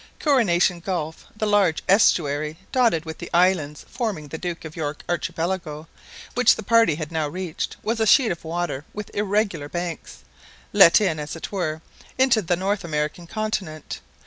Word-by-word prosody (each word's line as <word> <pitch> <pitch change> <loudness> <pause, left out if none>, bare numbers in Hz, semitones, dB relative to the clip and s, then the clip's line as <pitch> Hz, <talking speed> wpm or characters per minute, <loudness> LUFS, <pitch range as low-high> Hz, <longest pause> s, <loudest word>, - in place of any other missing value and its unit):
Coronation 190 - +3
Gulf, 165 -3 -4
the 215 - -1
large 205 -6 +2
estuary 155 -6 +3
dotted 230 -11 +2
with 160 0 -7
the - - -7
islands 170 -5 +2
forming 205 - -4
the 160 - -6
Duke 175 -2 -5
of 155 - -8
York 150 -2 -4
Archipelago, 165 -2 -3 0.5
which 245 -1 +5
the - - -7
party 230 -6 +4
had 155 0 -6
now 160 -2 -1
reached, 175 +1 -4
was 225 +2 -1
a 220 - +2
sheet 245 +1 +5
of 170 - -5
water 165 -4 -3
with 210 -1 -7
irregular 205 -7 -1
banks, 175 -1 -6 0.5
let 170 - +8
in, 165 -7 0
as 150 +1 -5
it 165 - -7
were, 160 -5 -3 0.3
into 260 -4 +4
the 175 -1 0
North 195 +3 -1
American 155 +1 -3
continent. 190 -7 -4
175 Hz, 165 wpm, -23 LUFS, 155-205 Hz, 0.5 s, let